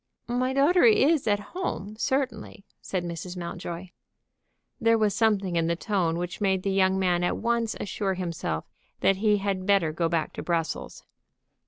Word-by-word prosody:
"My 250 +2 0
daughter 290 +7 +4
is 330 - +4
at 205 -1 +3
home, 215 - -4
certainly," 225 -4 -2 0.2
said 185 -2 -3
Mrs. 175 +1 -6
Mountjoy. 175 0 -6 0.9
There 230 0 +4
was 215 -2 +2
something 200 -5 +1
in 165 -1 +2
the 170 - +1
tone 175 -3 0
which 175 +3 -5
made 190 -2 +1
the 195 - 0
young 190 0 +3
man 180 -2 +1
at 175 - 0
once 235 -1 0
assure 195 -1 -2
himself 165 - -3 0.4
that 195 - +3
he 210 +1 +3
had 195 -1 -2
better 195 -6 +3
go 165 +1 0
back 165 -1 -1
to - - -5
Brussels. 165 -2 -3
195 Hz, 165 wpm, -26 LUFS, 175-225 Hz, 0.9 s, daughter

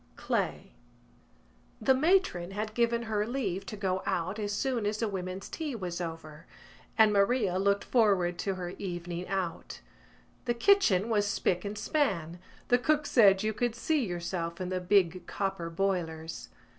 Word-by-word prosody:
CLAY - - -2 1.1
The 265 - +4
matron 285 - +2
had 215 +2 -4
given 235 0 +1
her 215 -2 0
leave 200 -7 -2
to 210 - -6
go 190 -1 -1
out 185 +5 -1
as 205 -1 -2
soon 235 0 -1
as 210 +1 -1
the 225 - 0
women's 190 -1 -5
tea 305 -5 -4
was 180 -4 -4
over 160 -2 -7 0.5
and 220 -2 +6
Maria 200 -2 +2
looked 200 +1 +2
forward 190 -7 +2
to 195 0 -1
her 180 -1 -5
evening 175 -1 -5
out. 185 -3 -3 0.7
The 240 -1 0
kitchen 235 - +4
was 210 -3 +1
spick 180 -3 0
and 205 +1 -5
span: 195 - -1 0.3
the 245 - +5
cook 300 +3 +1
said 200 -8 +5
you 215 0 0
could 230 +1 -1
see 300 +3 0
yourself 175 -2 -3
in 185 -1 -3
the 185 -1 -2
big 185 -1 +2
copper 195 -4 -3
boilers. 165 -3 -2
195 Hz, 155 wpm, -30 LUFS, 180-230 Hz, 1.1 s, and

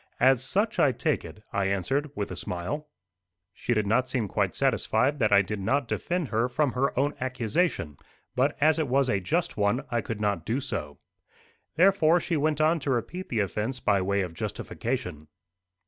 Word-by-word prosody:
"As 130 -1 +4
such 205 +11 0
I 140 - +5
take - - 0
it," 105 - -11
I 100 -1 +1
answered 100 - 0
with 100 -2 -3
a - - -4
smile. 90 - -4 0.7
She 120 - -1
did 105 -1 +1
not 125 +5 +1
seem 125 -4 -1
quite 100 -1 -1
satisfied 135 +1 +1
that 110 -4 +2
I 100 0 +6
did 105 +1 -4
not 130 +7 0
defend 175 0 -2
her 115 +2 +1
from 145 +2 +1
her 130 +1 -1
own 145 +2 +1
accusation; 130 - -1 0.4
but 135 +4 +1
as 155 +2 +4
it 155 - 0
was 135 0 +2
a 100 - +1
just 160 - -1
one, 105 +6 +1
I 120 -1 +1
could 110 0 -5
not 105 -1 0
do 120 +5 -1
so. 100 - -4 0.8
Therefore 175 -1 +5
she 170 0 -2
went 150 0 +1
on 160 +2 +3
to 140 - -4
repeat 150 +9 -2
the 115 -3 +1
offence 110 +6 -2
by 100 -4 +2
way 100 +1 +1
of 90 -3 -4
justification. 105 - -4
125 Hz, 190 wpm, -27 LUFS, 100-145 Hz, 0.8 s, I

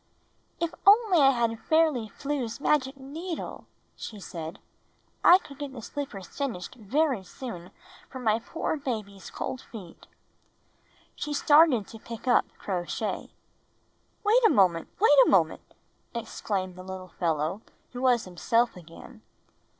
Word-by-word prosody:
"If 335 -1 -1
only 410 -4 +6
I 275 -2 +7
had 235 -3 0
Fairly 310 -8 +2
Flew's 275 -2 -4
magic 275 -2 +1
needle!" 315 +6 -6 0.3
she 215 - -8
said, 165 -4 -7 0.7
"I 355 - +9
could 280 -6 -13
get 285 -2 -5
the 245 - -8
slippers 265 -10 -6
finished 230 -7 -4
very 255 0 0
soon 180 -4 -8 0.4
for 260 - -8
my 225 -3 +1
poor 315 +6 -3
baby's 215 -8 -5
cold 260 - -5
feet." 190 -8 -12 1.1
She 300 - -4
started 290 -6 +5
to 225 - -12
pick 230 +3 -9
up 245 - +4
Crow 180 -3 -3
Shay. - - -3 0.9
"Wait 445 +4 +4
a 445 - +7
moment! 180 - +3
Wait 365 -8 +6
a - - +2
moment!" 165 -5 +3 0.5
exclaimed 195 -5 -3
the 185 - -8
little 185 -1 -8
fellow 165 +3 0 0.3
who 250 - -5
was 250 -3 +3
himself 230 +7 +1
again. 165 -2 -13
235 Hz, 135 wpm, -27 LUFS, 190-290 Hz, 1.1 s, I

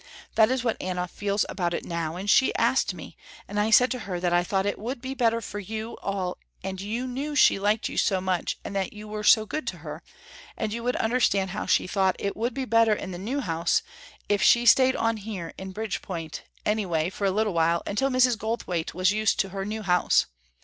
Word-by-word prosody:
That 220 0 +5
is 260 -1 0
what 230 -3 -1
Anna 180 -1 -2
feels 200 +2 -1
about 175 -3 -2
it - - -5
now, 165 -1 -3
and 190 +3 -6
she 265 +5 +4
asked - - +2
me - - -10 0.3
and 205 +1 -3
I 210 +1 +2
said 250 +3 +6
to 255 - -2
her 185 -5 -4
that 175 -1 0
I 175 0 +4
thought 190 +2 0
it 205 - -2
would 240 +5 -4
be 260 +2 -5
better 230 -3 +1
for 205 -1 -6
you 220 +3 -5
all 190 -2 -3 0.2
and 190 0 -4
you 225 +5 -3
knew 275 +4 -4
she 260 - +5
liked 210 +2 +1
you - - -7
so 190 -2 +2
much 185 -1 -1
and 200 - -6
that 190 -2 -1
you 210 0 -9
were 210 0 -5
so 215 +1 +6
good 310 +8 -4
to - - -3
her, - - -6 0.6
and 215 -1 -2
you 235 - -4
would 250 +1 0
understand 210 -5 +1
how 205 - -4
she - - +3
thought 190 0 +1
it 200 - -3
would 235 +2 -2
be 270 -1 -2
better 230 -1 +4
in 200 -2 -4
the 175 - -6
new 250 +9 -2
house 165 -5 0 0.4
if 205 -1 +1
she 240 0 +5
stayed 260 +3 +6
on 225 0 0
here 195 -5 -6
in 190 0 -7
Bridgepoint, 185 -6 -5 0.2
anyway 180 -6 0
for 200 - -3
a 195 - +3
little 210 0 0
while 170 0 +2
until 270 +7 0
Mrs. 255 -3 +3
Goldthwaite 205 -8 -3
was 185 +2 +3
used 215 0 +1
to 195 - -4
her 195 0 -4
new 215 +1 -4
house. 180 -2 +3
205 Hz, 230 wpm, -26 LUFS, 185-230 Hz, 0.6 s, said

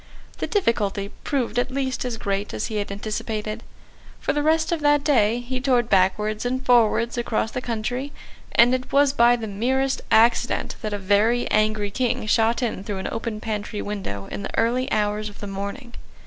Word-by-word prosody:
The - - -2
difficulty 205 - 0
proved 245 -4 -1
at 245 - 0
least 260 -1 -2
as 240 -2 -3
great 200 -1 -2
as - - -2
he 215 - -4
had 205 -1 -3
anticipated. 215 +1 -4 0.6
For - - -1
the 295 - 0
rest 315 +2 +2
of 340 - 0
that 290 -1 +3
day 235 -5 +3
he 255 +1 -4
toured 250 -3 +1
backwards 210 +3 +2
and 255 +2 -2
forwards 235 0 +3
across 225 -1 -1
the 250 - -3
country; 245 +4 -3 0.4
and 240 +2 +6
it 255 0 -2
was 280 0 +4
by 240 -2 +5
the 230 -2 -5
merest 260 +6 0
accident 230 +2 +3
that 215 -3 -3
a 205 - -1
very 205 +5 +2
angry 215 -1 +1
King 245 0 -1
shot 225 +3 +2
in 220 -5 -2
through 200 -1 -4
an 190 - -3
open 225 -1 -4
pantry 210 -1 -4
window 190 - -5
in - - -4
the - - -6
early 245 +3 +1
hours 210 0 0
of 205 - -15
the - - -6
morning. 200 +6 -6
230 Hz, 190 wpm, -23 LUFS, 210-255 Hz, 0.6 s, and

